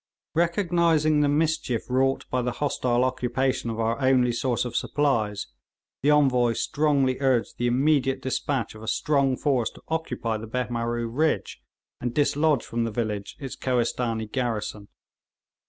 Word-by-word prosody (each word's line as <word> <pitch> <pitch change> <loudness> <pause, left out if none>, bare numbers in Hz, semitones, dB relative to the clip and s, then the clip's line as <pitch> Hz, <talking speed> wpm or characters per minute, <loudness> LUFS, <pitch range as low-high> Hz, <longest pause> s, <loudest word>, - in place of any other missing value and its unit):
Recognising 170 -3 +2
the 145 - +3
mischief 150 -6 0
wrought 135 +1 +1
by 125 - +1
the 125 0 -2
hostile 125 -3 0
occupation 130 0 0
of 115 0 -4
our 115 +4 0
only 130 -2 +3
source 120 +1 -1
of 120 -1 -5
supplies, 115 -10 0 0.6
the 145 - +2
Envoy 130 -5 +4
strongly 140 -1 +1
urged 130 -4 +1
the 120 - +1
immediate 135 +1 +2
despatch 130 -2 -2
of 110 - -12
a 110 - -9
strong 140 0 +1
force 130 -6 +1
to - - -17
occupy 160 -8 -2
the 110 +1 -8
Behmaroo 120 0 -2
ridge, 150 +7 -1 0.4
and 120 -1 -3
dislodge 145 -1 +2
from 115 0 -2
the 115 - -1
village 105 -3 -3
its 135 -3 -6
Kohistanee 120 -3 -1
garrison. 110 -5 -3
125 Hz, 145 wpm, -25 LUFS, 115-145 Hz, 0.6 s, Envoy